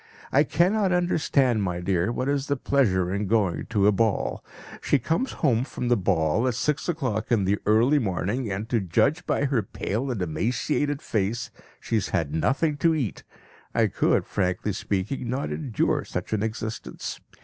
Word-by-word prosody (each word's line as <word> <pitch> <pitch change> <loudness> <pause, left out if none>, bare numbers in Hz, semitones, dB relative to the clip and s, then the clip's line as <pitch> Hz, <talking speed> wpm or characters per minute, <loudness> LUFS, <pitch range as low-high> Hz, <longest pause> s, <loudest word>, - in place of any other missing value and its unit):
I 145 - +5
cannot 185 +6 +2
understand, 145 -9 +2
my 90 -3 -1
dear, 90 +3 0
what 130 +2 -2
is 140 -1 0
the 140 - 0
pleasure 95 -10 +1
in 100 +1 -1
going 100 -4 +1
to 105 -4 +1
a 105 - +6
ball. 110 0 0 0.4
She - - +3
comes 165 - -1
home 125 -5 +3
from 125 -3 -4
the 120 - +5
ball 95 +2 +1
at 125 - 0
six 150 +6 -1
o'clock 125 -10 -2
in 105 -5 +3
the 100 +2 +1
early 120 +8 +4
morning, 105 +2 -2
and 100 +3 -3
to 120 - +2
judge 135 - +1
by 140 - +1
her 135 -4 +1
pale 110 +5 -3
and 120 -5 -2
emaciated 125 - -1
face, 110 +3 -1 0.3
she 115 - -1
has 105 - -1
had 80 -5 -1
nothing 145 - +1
to 165 +1 +3
eat. 130 -10 -3 0.5
I - - +4
could, - - +1
frankly 95 +1 -1
speaking, 105 +7 -2
not 130 +3 -2
endure 130 -9 0
such - - -5
an 105 - +1
existence. 110 - -4
115 Hz, 175 wpm, -25 LUFS, 100-140 Hz, 0.5 s, a